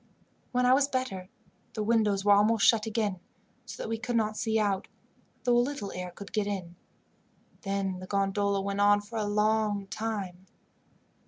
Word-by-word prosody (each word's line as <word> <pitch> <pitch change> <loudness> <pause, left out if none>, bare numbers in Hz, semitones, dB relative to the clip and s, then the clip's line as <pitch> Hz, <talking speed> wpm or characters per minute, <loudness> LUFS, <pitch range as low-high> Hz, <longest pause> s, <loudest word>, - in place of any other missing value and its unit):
When 250 0 +2
I 250 - +6
was 275 +1 +4
better 255 -9 -3 0.4
the 215 - -2
windows 210 -3 +2
were 205 - +5
almost 205 +1 +4
shut 225 -1 +4
again, 210 -4 -1 0.5
so - - -8
that - - -4
we 225 0 -2
could 240 +1 -3
not 215 -1 +1
see 220 0 0
out, 200 -3 0 0.6
though 245 -1 +3
a - - +5
little 245 -5 -2
air 180 0 -5
could 200 +3 -11
get 210 -2 0
in; 185 -4 -4 0.9
then 195 -2 -2
the 185 - -8
gondola 200 0 0
went 200 +1 -2
on 205 0 +5
for 220 +2 -6
a 210 - 0
long 210 -1 +1
time. 195 -3 -5
205 Hz, 175 wpm, -29 LUFS, 195-225 Hz, 0.9 s, I